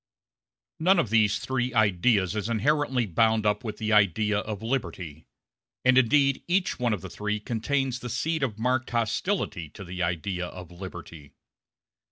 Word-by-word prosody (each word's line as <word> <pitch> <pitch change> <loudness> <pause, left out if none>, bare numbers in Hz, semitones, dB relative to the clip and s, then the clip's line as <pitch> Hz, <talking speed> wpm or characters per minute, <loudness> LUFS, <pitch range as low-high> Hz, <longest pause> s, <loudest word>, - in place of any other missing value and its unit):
None 185 +4 +4
of 150 -11 0
these 110 -2 +3
three 125 -1 -2
ideas 100 -1 +2
is 105 +1 -2
inherently 130 +2 +1
bound 110 +3 +2
up 105 0 +1
with 110 -3 -5
the 110 -1 -1
idea 105 +1 +3
of 105 0 -5
liberty; 95 - -4 0.6
and 130 0 +6
indeed 135 +2 +3
each 180 -2 0
one 120 -2 +1
of 105 -5 -2
the - - -7
three 105 0 -2
contains 125 +4 -1
the 125 - -6
seed 160 +6 -1
of 120 -6 -1
marked 125 +3 0
hostility 115 - -1
to 100 - -10
the 90 0 -6
idea 90 +1 -2
of 90 -1 -10
liberty. 85 -5 -10
110 Hz, 160 wpm, -26 LUFS, 100-130 Hz, 0.6 s, and